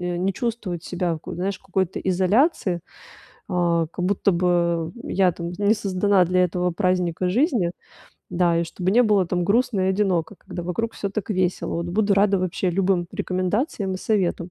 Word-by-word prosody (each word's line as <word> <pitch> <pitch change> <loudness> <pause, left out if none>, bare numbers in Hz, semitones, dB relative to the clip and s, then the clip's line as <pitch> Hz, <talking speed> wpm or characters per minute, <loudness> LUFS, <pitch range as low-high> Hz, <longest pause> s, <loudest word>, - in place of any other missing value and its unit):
э, 180 0 -2
не 185 +3 0
чувствовать 220 -7 -4
себя, 175 -2 -2
ку - - -8
знаешь, 190 +2 -2
в - - -35
какой-то 190 -2 -1
изоляции. 190 - +2 0.7
А, 170 -3 +1
как 180 +2 -4
будто 200 +1 +2
бы, 170 -2 +1
э, - - -6
я, 185 -2 +3
там, 170 +1 -5
не 205 +1 +3
создана 200 -2 +2
для 180 +1 +2
этого 180 +1 -1
праздника 180 -1 0
жизни. 230 - +1 0.6
Да. 175 -1 +2
И - - 0
чтобы 180 +3 -2
не 245 +3 +6
было, 205 -5 +3
там, 175 +1 -1
грустно 215 +1 +1
и 185 - +2
одиноко, 190 -2 0
когда 175 - -7
вокруг 225 +7 -2
всё 200 - -4
так 215 +1 -4
весело. 185 -2 -1
Вот 170 +1 -3
буду 200 +3 +1
рада 200 0 +3
вообще 185 0 -1
любым 185 -1 +1
рекомендациям 190 - -1
и - - -2
советам. 185 -4 -1
185 Hz, 180 wpm, -23 LUFS, 175-200 Hz, 0.7 s, не